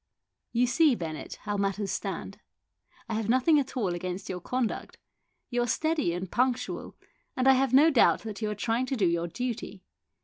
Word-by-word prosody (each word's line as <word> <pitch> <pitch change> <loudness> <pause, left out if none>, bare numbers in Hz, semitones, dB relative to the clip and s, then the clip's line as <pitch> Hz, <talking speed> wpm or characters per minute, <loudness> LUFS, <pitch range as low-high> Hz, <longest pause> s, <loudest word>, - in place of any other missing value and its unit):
"You 245 +1 +3
see, 290 +2 +4
Bennett, 160 -6 -6
how 205 -1 -2
matters 195 0 -1
stand. - - -4 0.7
I 230 - -4
have 220 0 -2
nothing 260 +5 +4
at 265 -1 -4
all 210 -7 +1
against 180 +2 -5
your 180 - -3
conduct. 250 +2 -3 0.5
You 245 0 +1
are 240 - 0
steady 315 - +1
and 180 +1 -4
punctual, 255 0 -1 0.4
and 255 +1 +2
I 265 - +8
have 265 -1 +2
no 295 +5 +6
doubt 265 - +4
that 220 -1 -7
you 215 - 0
are 210 - -3
trying 230 +4 0
to 270 - -1
do 210 -6 +2
your 170 0 +1
duty. 220 -1 -5
230 Hz, 190 wpm, -28 LUFS, 195-255 Hz, 0.7 s, I